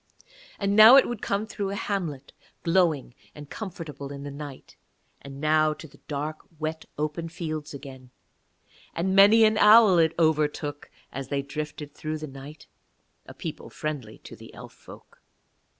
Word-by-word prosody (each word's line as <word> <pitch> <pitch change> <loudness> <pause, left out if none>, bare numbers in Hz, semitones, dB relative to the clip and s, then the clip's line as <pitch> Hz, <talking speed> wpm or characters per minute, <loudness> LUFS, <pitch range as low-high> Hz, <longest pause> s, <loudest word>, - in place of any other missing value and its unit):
And 200 0 0
now 220 +4 +10
it 275 - +6
would 240 -3 -5
come 200 +2 -1
through 205 -2 -4
a 200 - -4
hamlet 165 -10 -4 0.3
glowing 165 -7 +1 0.2
and 145 -1 -11
comfortable 155 - -7
in 140 0 -8
the 145 - -6
night; 140 -1 -10 0.5
and 140 0 -10
now 155 +1 +2
to 160 - -11
the - - -20
dark, 150 +2 -4 0.2
wet, 155 +1 -4
open 155 +3 -3
fields 155 -3 -5
again; 130 -2 -11 0.9
and 190 +3 0
many 205 +3 +7
an 215 0 +3
owl 210 -4 +7
it 160 -1 +2
overtook 150 -2 0 0.2
as 135 0 -6
they 140 0 -2
drifted 150 +1 -6
through 155 +1 -4
the 155 - -6
night, 140 +1 -11 0.6
a - - -11
people - - -7
friendly 140 -8 -5
to - - -11
the - - -13
Elf - - -11
folk. - - -16
155 Hz, 160 wpm, -26 LUFS, 145-190 Hz, 0.9 s, now